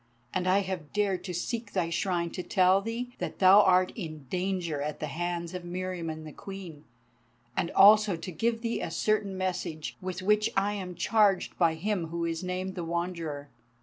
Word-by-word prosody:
And 185 0 0
I 190 +2 +4
have 185 -6 -5
dared 200 -3 0
to 185 - -4
seek 225 +4 -3
thy 170 -3 0
Shrine 170 -1 0
to 185 - -4
tell 185 +2 +3
thee 235 +3 -4
that - - -4
thou 195 +2 +8
art 185 -1 +4
in 155 - -7
danger 180 -5 -1
at 150 +1 -3
the - - -2
hands 170 +3 -3
of 180 - -4
Meriamun 175 -3 -4
the 155 - -8
Queen, 180 -5 -9 0.7
and 170 - 0
also 210 -1 +7
to 170 +3 -7
give 225 +7 -1
thee 230 0 -2
a - - -3
certain 200 +3 0
message 175 -4 -3
with 185 0 -4
which 210 +2 +3
I 200 +1 +2
am 185 -3 -5
charged 210 -3 +2
by 165 -2 +4
him 185 0 -1
who 170 +1 -3
is 165 +1 -3
named 185 +1 -3
the 175 - -4
Wanderer." 165 -4 -3
185 Hz, 185 wpm, -29 LUFS, 170-195 Hz, 0.7 s, thou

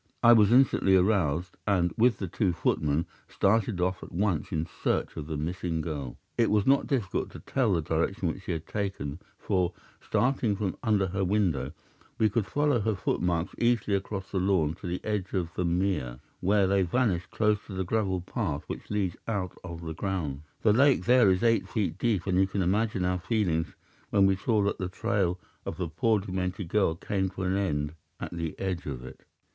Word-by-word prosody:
I 120 0 +9
was 105 -2 +5
instantly 120 -6 +5
aroused, 90 -4 +1
and, 90 -4 +2
with 115 -2 +3
the 95 - -4
two 90 +1 0
footmen, 75 -1 0 0.2
started 105 -1 +1
off 90 +1 0
at - - -10
once 90 -4 0
in 80 0 -1
search 85 - -2
of 75 -2 -6
the 80 -2 -3
missing 85 +1 -2
girl. 75 -6 -4 0.2
It 115 - +4
was 105 -1 +2
not 135 +1 +3
difficult 115 -10 -1
to - - -8
tell 125 -7 +1
the 85 -3 +1
direction 85 +4 0
which 85 +3 -3
she - - -2
had 80 -1 -3
taken, 95 -8 -3 0.2
for, 90 -3 0 0.3
starting 115 -1 +1
from 100 -2 -2
under 105 -4 +2
her 95 +1 -2
window, 95 -8 0 0.4
we 110 -2 +3
could 105 -1 0
follow 145 -4 +2
her 110 0 0
footmarks 90 -2 -1
easily 115 -4 +2
across 95 0 -4
the 95 - 0
lawn 90 -5 +2
to - - -5
the 90 +1 -3
edge 105 -3 -2
of 85 -4 -1
the 90 - -1
mere, 85 -9 0 0.2
where 100 +2 +3
they 100 +1 +3
vanished 95 -2 0
close 105 -1 +1
to 100 - -8
the 95 - -1
gravel 95 -2 0
path 85 - -3
which - - -7
leads 100 -4 -1
out 100 -5 -2
of 85 -2 -7
the 80 -1 -5
grounds. 80 -6 -3 0.2
The 105 - +5
lake 130 -5 +4
there 125 -3 +6
is 95 +2 +2
eight 115 -1 +2
feet 95 -7 -1
deep, 105 -8 +1
and 95 -1 +2
you 95 - +4
can 95 0 -1
imagine 100 +1 +1
our 90 0 0
feelings 85 -6 0 0.3
when 100 -2 +4
we 95 0 +4
saw 105 +2 +1
that 100 - -1
the 95 -2 -2
trail 95 -3 0 0.2
of 80 - -5
the 90 - -2
poor 105 +7 +2
demented 95 -1 -3
girl 95 -5 +2
came 95 +2 -1
to 95 0 -6
an 95 0 +1
end 75 -7 -1 0.3
at - - -6
the 85 -2 -4
edge 95 -4 -3
of 65 -3 -5
it. 65 0 -11
95 Hz, 200 wpm, -28 LUFS, 85-105 Hz, 0.4 s, I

